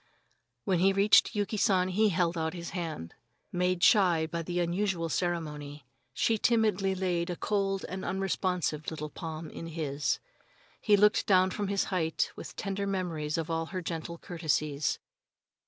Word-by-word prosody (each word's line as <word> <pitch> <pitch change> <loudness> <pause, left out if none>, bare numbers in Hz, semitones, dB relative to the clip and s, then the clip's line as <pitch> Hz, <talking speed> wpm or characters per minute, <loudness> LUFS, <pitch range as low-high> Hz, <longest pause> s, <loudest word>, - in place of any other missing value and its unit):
When 185 -3 +2
he 195 +2 +4
reached 200 +3 +5
Yuki 205 +1 -1
San 190 -4 +3
he 210 +3 +3
held 175 -1 +1
out 160 +1 -2
his 170 -1 -6
hand. 160 - -5 0.4
Made 180 0 0
shy 180 -7 +5
by 170 +1 -3
the 175 +2 -2
unusual 175 -1 0
ceremony, 150 -5 -3 0.3
she 220 - +1
timidly 210 -5 +2
laid 180 -2 -1
a 175 - -2
cold 195 0 -1
and 190 0 -5
unresponsive 185 -5 -1
little 150 -2 -6
palm 160 0 -6
in 165 - -7
his. 150 -3 -1 0.6
He 210 -2 +4
looked 210 +1 +4
down 185 -1 +4
from 205 0 -2
his 200 0 +1
height 165 -3 0
with - - -9
tender 200 0 -3
memories 170 -6 -2
of 165 0 -3
all 165 0 -1
her 185 +1 -4
gentle 165 0 -4
courtesies. 155 -4 -1
175 Hz, 155 wpm, -30 LUFS, 160-195 Hz, 0.6 s, reached